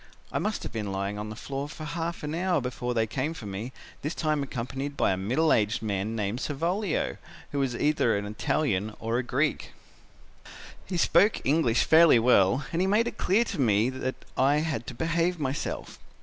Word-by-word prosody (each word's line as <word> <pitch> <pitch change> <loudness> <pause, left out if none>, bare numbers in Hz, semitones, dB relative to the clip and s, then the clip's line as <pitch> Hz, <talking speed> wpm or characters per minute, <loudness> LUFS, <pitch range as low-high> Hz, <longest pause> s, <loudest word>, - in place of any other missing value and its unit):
I - - -1
must 215 0 -2
have - - -5
been 105 -3 -3
lying 100 +2 -3
on 105 0 -5
the 110 - -6
floor 140 +5 -5
for 155 - -8
half 165 +1 -4
an 150 +1 -3
hour 175 0 +1
when 125 -1 -3
they 115 -1 +2
came 135 +8 -2
for 115 - -8
me, 100 +5 -5 0.3
this 150 +3 -3
time 155 -2 0
accompanied 135 +2 -4
by - - +3
a - - +1
middle 125 +12 +2
aged 110 +1 +1
man 105 +1 -2
named 105 +2 -2
Savolio, 170 +5 -1 0.3
who 145 - -1
was 135 -3 0
either 145 -6 +2
an 100 - -3
Italian 105 -1 -1
or 115 +2 -1
a - - -1
Greek. 140 +5 -1 1.1
"He 180 - -2
spoke 175 +5 +3
English 135 -5 +3
fairly 160 -4 +7
well 115 +1 +4
and 170 - +1
he 190 - +2
made 215 +4 +3
it - - -5
clear 205 +6 +3
to 180 - -3
me 110 +1 +3
that 130 0 -3 0.2
I 135 +3 +3
had 145 -8 -3
to 125 - -6
behave 170 +3 0
myself. 135 0 -3
135 Hz, 195 wpm, -27 LUFS, 110-160 Hz, 1.1 s, fairly